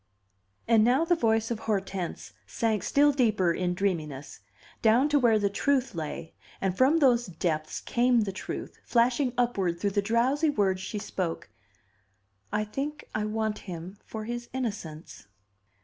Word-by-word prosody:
And 225 -2 +5
now 255 +8 +3
the 350 - +3
voice 225 -6 +1
of 230 - -2
Hortense 195 - -3
sank 215 - 0
still 290 +8 +4
deeper 215 -10 +2
in 180 0 -1
dreaminess, 155 -8 -3 0.4
down 235 +5 +4
to 290 -1 +4
where 235 -4 +4
the 205 -1 +1
truth 260 +4 0
lay; 160 -1 -5 0.3
and 190 -2 -1
from 270 +8 +4
those 245 -6 +3
depths 160 -3 -2
came 245 0 +2
the 205 -2 -1
truth, 190 - -6
flashing 245 +2 +2
upward 195 -9 0
through 200 +1 0
the 205 - +1
drowsy 250 +9 +2
words 195 -8 +1
she 210 - -5
spoke: 185 - -4 1.0
"I 210 +1 0
think 280 +8 -5
I 210 - -1
want 215 0 -2
him 180 +3 -7
for 220 -1 -7
his 240 +1 -5
innocence." 200 - -5
215 Hz, 150 wpm, -28 LUFS, 185-245 Hz, 1.0 s, And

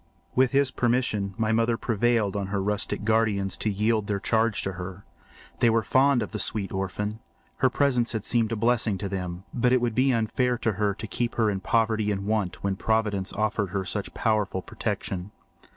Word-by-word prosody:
With 130 0 +4
his 140 -1 +3
permission 115 -6 0
my 110 -1 +1
mother 115 +1 +2
prevailed 115 -3 +1
on 100 -1 -2
her 100 0 -1
rustic 105 +1 -2
guardians 105 -3 +1
to 110 - -1
yield 105 +1 +1
their 100 -1 -1
charge 110 +1 +1
to 95 - -2
her. 95 +1 -8 0.5
They 120 - +5
were 115 0 +2
fond 130 +3 +3
of - - -7
the 105 - -4
sweet 100 -2 0
orphan. 105 +3 -3 0.4
Her 130 - +3
presence 125 -4 +1
had 110 -2 -3
seemed 115 -2 +2
a - - 0
blessing 115 -2 +1
to 100 - -4
them, 90 -1 -4
but 125 0 +2
it 130 - +5
would 120 -2 -1
be 130 +3 +3
unfair 125 +2 +1
to 115 - 0
her 100 0 0
to 110 - -7
keep 120 +2 -2
her 110 -2 +2
in 95 - -2
poverty 110 +1 +1
and 100 -1 -3
want 105 -4 -1
when 100 -1 -1
Providence 105 -4 0
afforded 105 -2 0
her 95 -1 -1
such 100 +2 -2
powerful 105 -5 0
protection. 95 0 -4
110 Hz, 200 wpm, -26 LUFS, 100-115 Hz, 0.5 s, They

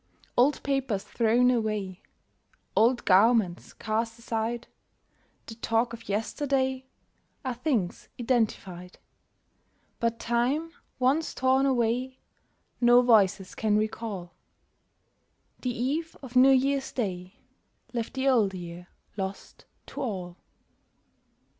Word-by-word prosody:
Old 265 +4 +3
papers 270 -8 -1
thrown 240 +2 +3
away, 215 -5 -2 0.7
Old 235 +2 +3
garments 195 -2 +3
cast 225 +1 -2
aside, 230 0 -3 0.8
The - - -8
talk 230 +1 0
of 230 -2 -10
yesterday, 260 +4 -1 0.6
Are 255 - -1
things 240 - -2
identified; 210 -7 -1 1.0
But 230 0 0
time 245 +8 0 0.3
once 275 +6 +1
torn 260 +1 +3
away 250 +1 0 0.6
No 240 +1 +6
voices 200 -5 +3
can 215 -1 +1
recall: 215 -4 -3 1.3
The 250 - -1
eve 280 +7 -2
of 255 -1 -10
New 255 +2 +7
Year's 270 +1 +2
Day 185 -4 -4 0.6
Left 235 0 -3
the 265 +1 0
Old 220 -8 +3
Year 175 0 -8 0.3
lost 190 0 -6 0.2
to - - -7
all. 185 -8 -4
235 Hz, 105 wpm, -27 LUFS, 210-260 Hz, 1.3 s, New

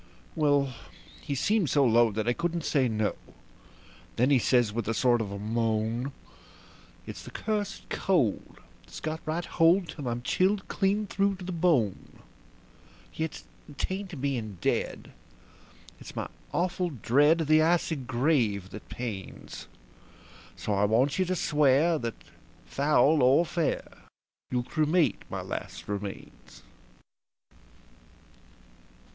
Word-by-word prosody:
Well, 145 -4 +2 0.5
he 140 - -3
seemed 200 - +1
so 140 -2 +3
low 120 -1 +4
that 110 +2 -2
I 120 - +3
couldn't 170 +2 -2
say 135 -4 +2
no; 110 -2 0 1.0
then 125 +4 +2
he 135 - +5
says 120 -3 +2
with 115 -2 -3
a 115 - 0
sort 120 -1 +3
of 100 -2 -4
moan: 115 +3 -1 0.9
"It's - - -8
the - - -10
cursed 210 -2 -3
cold, 170 - 0
and - - -22 0.2
it's - - -9
got 155 0 -3
right 165 +2 -1
hold 170 +1 +3
till 145 -4 -6
I'm 120 0 -3
chilled 190 +7 +1
clean 200 +2 0
through 200 0 0
to 185 -1 -9
the 185 - -4
bone. 160 - 0 1.0
Yet 160 -1 -4 0.3
'tain't 190 -5 -4
being 120 -8 -2
dead - - -2 0.9
it's - - -11
my - - -3 0.2
awful 180 0 0
dread 145 +5 +3
of 160 - -2
the 155 0 +5
icy 165 0 +2
grave 120 - 0
that 105 - -10
pains; 110 -6 -7 0.9
So 105 - -3
I 100 +1 +3
want 125 - +2
you 185 - +3
to 185 +1 -1
swear 150 +1 +3
that, 115 -2 -4 0.5
foul 145 +1 +3
or 135 +7 +5
fair, 165 -2 -1 0.7
you'll 125 -1 0
cremate 155 +5 +1
my - - -4
last - - -6
remains." 100 -1 -7
140 Hz, 130 wpm, -28 LUFS, 115-170 Hz, 1.0 s, he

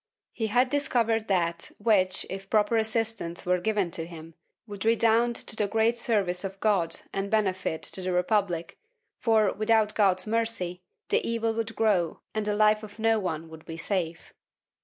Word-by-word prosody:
He 225 - -2
had 250 +4 +2
discovered 230 -6 +1
that 170 -3 0
which, 200 -4 +2
if 195 0 -7
proper 215 +1 +2
assistance 220 -5 -1
were 180 0 +2
given 205 -2 0
to 165 0 -4
him, 165 -1 -11 0.3
would 205 -3 -7
redound 230 +1 +3
to - - -4
the 210 -2 0
great 225 +3 +2
service 205 -7 0
of 195 0 -6
God 185 -6 +1
and 195 0 -2
benefit 190 -6 0
to 190 - -3
the 185 0 -2
Republic 180 -2 0 0.4
for, 220 -4 +3
without 215 0 +2
God's 185 -3 +2
mercy, 220 -6 -1 0.3
the - - +3
evil 230 -1 -1
would 225 0 -3
grow 200 -7 +1
and 215 -1 -2
the 210 - +1
life 215 0 +4
of 210 -1 -11
no 225 0 +2
one 165 -4 -3
would 160 0 -12
be 165 - -8
safe. 170 -3 -3
210 Hz, 170 wpm, -27 LUFS, 180-225 Hz, 0.4 s, life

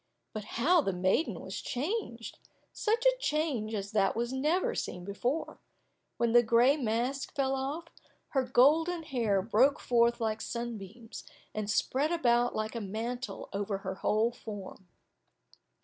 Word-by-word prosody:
But 215 -1 -5
how 330 +8 +4
the 195 -9 -1
maiden 185 - +1
was - - -6
changed! 255 - -4 0.3
Such 460 +3 0
a - - +5
change 285 - -1
as 200 0 -4
that 200 -3 +2
was 235 +2 -2
never 340 - +1
seen 180 - -4
before! 240 +10 -2 0.6
When 235 -1 +1
the 240 +1 +7
gray 240 +4 +4
mask 250 +2 -2
fell 270 -2 +1
off, 275 +5 -3 0.4
her 270 - +1
golden 310 +7 +3
hair 230 - 0
broke 235 +6 +4
forth 235 -1 +2
like 220 -1 -1
sunbeams, 230 -1 -6 0.3
and 215 -1 -3
spread 275 +8 +1
about 245 -7 +2
like 215 0 -2
a 230 - -4
mantle 225 +2 -4
over 200 0 -2
her 190 - -2
whole 215 +4 +1
form. 205 -5 -9
240 Hz, 145 wpm, -30 LUFS, 215-280 Hz, 0.6 s, the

